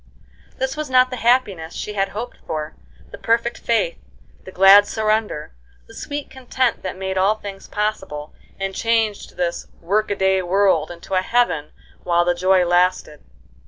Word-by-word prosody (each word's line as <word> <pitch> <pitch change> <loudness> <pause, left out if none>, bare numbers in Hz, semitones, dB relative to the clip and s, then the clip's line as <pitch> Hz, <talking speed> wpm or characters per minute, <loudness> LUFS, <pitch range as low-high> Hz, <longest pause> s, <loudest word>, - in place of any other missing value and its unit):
This 265 +1 -2
was 305 -2 -4
not 255 0 +4
the 255 - -4
happiness 220 -10 +1
she 210 - -5
had 195 -1 0
hoped 230 +5 -6
for, 155 0 -4 0.4
the - - -10
perfect 235 +1 0
faith, - - 0 0.5
the 190 - -9
glad 195 +2 +7
surrender, 215 - -1 0.3
the - - -16
sweet 290 0 -5
content 260 -1 -1
that 185 -1 -5
made 190 0 -2
all 200 +3 +3
things 200 -2 -9
possible, 185 -8 -3 0.3
and 195 0 -3
changed 225 -2 -1
this 175 -1 -2
work 205 +5 0
a 205 - 0
day 190 -1 +2
world 190 +2 +2
into 175 +2 -9
a 185 - +3
heaven 185 -9 0 0.3
while 175 -1 +2
the 175 - +2
joy 185 +1 +3
lasted. 175 -3 +1
195 Hz, 160 wpm, -21 LUFS, 180-230 Hz, 0.5 s, glad